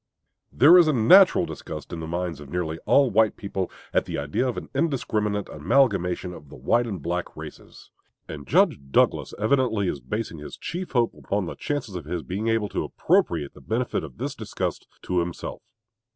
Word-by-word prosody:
There 160 +8 +7
is 170 - +5
a 155 - +3
natural 180 - +6
disgust 80 - -8
in 85 - -4
the 80 - -5
minds 85 -1 -3
of 75 -2 -11
nearly 80 -1 -3
all 140 -3 +5
white 110 +1 +3
people 95 -2 -3 0.2
at - - +2
the - - -4
idea 75 - -1
of 125 - -3
an - - -5
indiscriminate 110 - -1
amalgamation 90 - +1
of 75 -4 -12
the - - -11
white 120 - +1
and 100 -5 -4
black 85 +3 -4
races; - - -11 0.4
and 70 -4 -8
Judge - - +3
Douglas - - +2
evidently 110 -2 +1
is 70 - -2
basing 105 -4 -4
his 75 - -9
chief 180 -1 -5
hope 120 -3 +2
upon 100 -1 -2
the - - -5
chances 145 -8 -4
of 85 -5 -5
his 85 +1 -4
being 100 +5 -3
able 115 -2 +1
to - - -2
appropriate 70 - +1
the - - -15
benefit 115 -3 -2
of 70 -5 -10
this - - -3
disgust - - -4 0.2
to 90 - 0
himself. 85 0 -4
100 Hz, 190 wpm, -25 LUFS, 85-120 Hz, 0.4 s, There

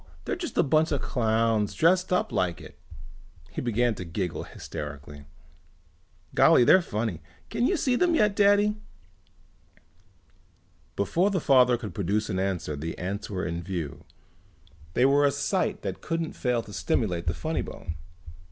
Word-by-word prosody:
They're - - -1
just 350 -2 -6
a - - +5
bunch 155 +3 +2
of 145 - +1
clowns 110 -3 0
dressed 180 +3 +3
up 180 - +1
like 90 -1 0
it." - - -12 0.8
He - - -4
began 120 0 +1
to 95 - -7
giggle 90 +1 -4
hysterically. 75 0 -8 1.1
"Golly, - - +6
they're 185 +9 +6
funny. 105 - -3 0.3
Can 235 +3 +1
you 385 - +1
see 255 -4 +1
them 345 +5 +2
yet, 210 -8 +3
Daddy?" 205 +1 +4 2.2
Before 170 - +1
the 195 -2 0
father 125 -4 +4
could 110 -3 -7
produce 105 +2 -1
an 95 - -1
answer 95 -5 -2
the 80 +3 -5
ants 100 +4 -4
were 95 -3 -3
in 85 0 -3
view. 85 -6 -5 0.9
They 125 - +4
were 140 +1 +4
a 145 - +5
sight 190 +8 -1
that - - -4
couldn't 165 -1 -3
fail 125 -3 -1
to 105 - -12
stimulate 90 -2 -1
the 80 - 0
funny - - -2
bone. 80 - -7
115 Hz, 155 wpm, -27 LUFS, -, 2.2 s, Golly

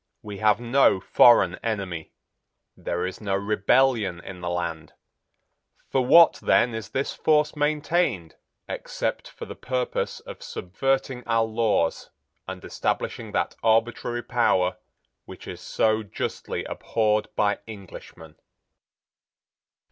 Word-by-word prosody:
We 105 -2 -7
have 105 0 +3
no 120 -4 +3
foreign 95 -2 +5
enemy. 95 -8 -4 0.6
There 90 +1 -3
is 95 +3 -6
no 100 -2 -1
rebellion 105 0 +2
in 90 0 -10
the 90 - -3
land. 85 -2 -4 1.0
For 130 - +2
what, 170 +6 +6
then, 120 - +3
is 110 -3 -6
this 135 +5 -2
force 150 -1 +2
maintained, 150 - 0 0.3
except - - -4
for - - -9
the - - -8
purpose 125 -1 -3
of - - -11
subverting 130 +6 -2
our 115 -1 +2
laws 110 -7 0 0.4
and - - -7
establishing - - -3
that - - -1
arbitrary 115 +1 +1
power 95 -7 +1 0.5
which - - -11
is - - -8
so 110 0 +1
justly 105 - -4
abhorred 105 -1 0
by 105 -1 +1
Englishmen?" 90 -6 -11
110 Hz, 120 wpm, -25 LUFS, 95-125 Hz, 1.0 s, what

